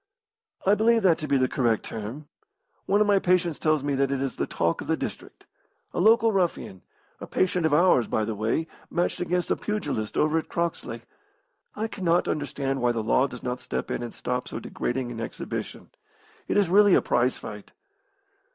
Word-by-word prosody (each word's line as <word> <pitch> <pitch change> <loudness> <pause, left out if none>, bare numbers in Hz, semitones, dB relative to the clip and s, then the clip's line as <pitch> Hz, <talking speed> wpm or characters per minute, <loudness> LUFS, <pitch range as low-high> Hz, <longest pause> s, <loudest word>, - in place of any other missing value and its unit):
"I 195 - +5
believe 225 +1 +3
that 170 -4 +4
to 155 - -4
be 140 -1 +3
the 130 -1 +2
correct 120 -4 +1
term. 115 +8 -6 0.6
One 205 +1 +3
of - - +5
my 205 -1 +4
patients 180 -4 +1
tells 155 -3 +1
me 145 0 0
that 135 0 +1
it 140 - 0
is 135 -1 -2
the - - -1
talk 85 0 0
of - - -8
the - - +1
district. - - -7 0.5
A - - -2
local 225 +4 +5
ruffian, 175 - -1 0.4
a - - -8
patient 180 -3 +1
of - - -3
ours, 160 -8 +4
by 110 - 0
the 110 - -2
way, 110 +9 -1 0.2
matched 175 0 -1
against 180 0 -1
a - - +4
pugilist 145 - -3
over 155 +2 +3
at - - -8
Croxley. 165 -9 -3 0.7
I 220 +1 -2
cannot 175 -5 +1
understand 140 -2 -2
why 120 0 +3
the 115 -2 -2
law 130 +5 +3
does 125 -2 -10
not 125 0 -3
step - - -4
in - - -2
and 120 -1 -5
stop 125 0 -3
so - - -4
degrading 125 0 -3
an 115 -1 -6
exhibition. 115 - -6 0.6
It - - +1
is 200 -3 +4
really 200 +2 +6
a - - +4
prize 125 +1 +1
fight." 105 -2 -9
150 Hz, 195 wpm, -26 LUFS, 120-180 Hz, 0.7 s, really